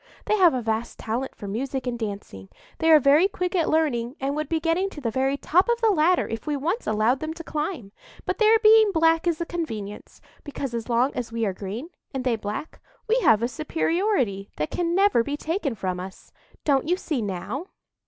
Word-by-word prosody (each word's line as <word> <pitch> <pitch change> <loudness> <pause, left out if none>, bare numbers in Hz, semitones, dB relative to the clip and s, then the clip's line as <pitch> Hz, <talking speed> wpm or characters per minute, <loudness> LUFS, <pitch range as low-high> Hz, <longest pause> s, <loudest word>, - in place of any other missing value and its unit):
They 425 - +2
have 355 -8 +5
a 250 - -2
vast 225 +1 -2
talent 240 +4 -3
for 205 - -8
music 260 +6 -3
and 240 -1 -3
dancing; 200 - -6 0.3
they 325 - +2
are 315 -1 +8
very 290 +6 +5
quick 360 -2 -3
at 335 -3 +2
learning, 270 -6 0
and 275 +1 -2
would 305 0 -3
be 325 - +1
getting 335 +4 0
to 320 - -10
the 235 -5 -2
very 265 +4 0
top 365 +9 +2
of 475 0 +2
the 450 -2 +3
ladder 350 0 +3
if 225 +4 -6
we 295 -1 0
once 345 - -2
allowed 220 +5 +2
them 315 +1 -4
to 335 - -8
climb. 300 - -4 0.3
But - - -2
their 440 0 +6
being 435 -1 +6
black 325 +1 +3
is 335 -2 +1
a 340 - -2
convenience; 220 -13 -6 0.2
because, 275 -3 -5
as 230 0 -4
long 245 +3 +2
as 240 -2 -4
we 230 -1 -1
are 195 - -1
green 210 - -6 0.2
and 260 - -2
they 250 -2 +1
black, 215 +8 -6 0.3
we 460 +3 +3
have 225 - +4
a - - +2
superiority 310 - -1
that 150 +1 -2
can 345 -1 -1
never 395 - +4
be 285 +4 -3
taken 315 - -2
from 185 -3 -3
us. 190 +1 -10 0.3
Don't 280 -1 +2
you 360 - +2
see 305 -9 -2
now?" 210 - -4
280 Hz, 215 wpm, -25 LUFS, 230-335 Hz, 0.3 s, are